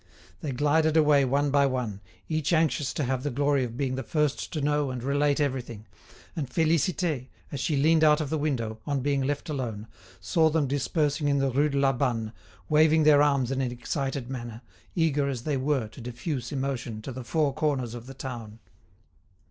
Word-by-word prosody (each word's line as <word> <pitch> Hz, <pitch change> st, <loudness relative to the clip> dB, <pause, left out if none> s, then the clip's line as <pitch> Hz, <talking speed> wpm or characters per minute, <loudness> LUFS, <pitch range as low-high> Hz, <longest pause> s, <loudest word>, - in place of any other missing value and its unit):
They 150 Hz, -, -4 dB
glided 155 Hz, +4 st, +2 dB
away 150 Hz, -3 st, +5 dB
one 140 Hz, +2 st, +1 dB
by 140 Hz, 0 st, +4 dB
one, 120 Hz, -7 st, -3 dB, 0.3 s
each 155 Hz, 0 st, 0 dB
anxious 155 Hz, -4 st, +2 dB
to 150 Hz, -, -1 dB
have 130 Hz, 0 st, -1 dB
the 145 Hz, -, -2 dB
glory 140 Hz, +1 st, +1 dB
of 120 Hz, -1 st, -5 dB
being 135 Hz, -2 st, -1 dB
the 130 Hz, -, -2 dB
first 150 Hz, +2 st, -1 dB
to 155 Hz, -, -1 dB
know 145 Hz, -1 st, +1 dB
and 125 Hz, -2 st, -5 dB
relate 145 Hz, +2 st, +1 dB
everything, 125 Hz, -6 st, -2 dB, 0.5 s
and 145 Hz, -6 st, -3 dB
Félicité, 160 Hz, -2 st, +1 dB, 0.2 s
as 140 Hz, -, -4 dB
she 145 Hz, +2 st, 0 dB
leaned 160 Hz, +3 st, +4 dB
out 150 Hz, -1 st, +5 dB
of 150 Hz, -3 st, -3 dB
the 160 Hz, -, +1 dB
window, 115 Hz, -7 st, -2 dB
on 140 Hz, -2 st, 0 dB
being 140 Hz, 0 st, +1 dB
left 145 Hz, +2 st, -2 dB
alone, 120 Hz, -8 st, -4 dB, 0.3 s
saw 160 Hz, -, +2 dB
them 155 Hz, -1 st, +1 dB
dispersing 145 Hz, +2 st, 0 dB
in 140 Hz, 0 st, +2 dB
the 135 Hz, -1 st, +1 dB
Rue 145 Hz, +4 st, +2 dB
de 140 Hz, -, -2 dB
la 135 Hz, -1 st, +3 dB
Banne, 120 Hz, -4 st, -1 dB, 0.3 s
waving 155 Hz, +1 st, +4 dB
their 150 Hz, -1 st, +6 dB
arms 140 Hz, -4 st, +2 dB
in 135 Hz, 0 st, 0 dB
an 125 Hz, -2 st, -1 dB
excited 135 Hz, +1 st, -3 dB
manner, 120 Hz, -2 st, -7 dB, 0.3 s
eager 150 Hz, -4 st, +1 dB
as 125 Hz, -4 st, -4 dB
they 150 Hz, 0 st, -1 dB
were 135 Hz, -3 st, 0 dB
to 125 Hz, -, -12 dB
diffuse 125 Hz, +2 st, -4 dB
emotion 130 Hz, -5 st, -3 dB
to 135 Hz, -, -5 dB
the 130 Hz, 0 st, -7 dB
four 150 Hz, +2 st, +1 dB
corners 135 Hz, -6 st, -1 dB
of 120 Hz, 0 st, -8 dB
the 135 Hz, -, -9 dB
town. 120 Hz, -5 st, -7 dB
140 Hz, 195 wpm, -27 LUFS, 125-150 Hz, 0.5 s, their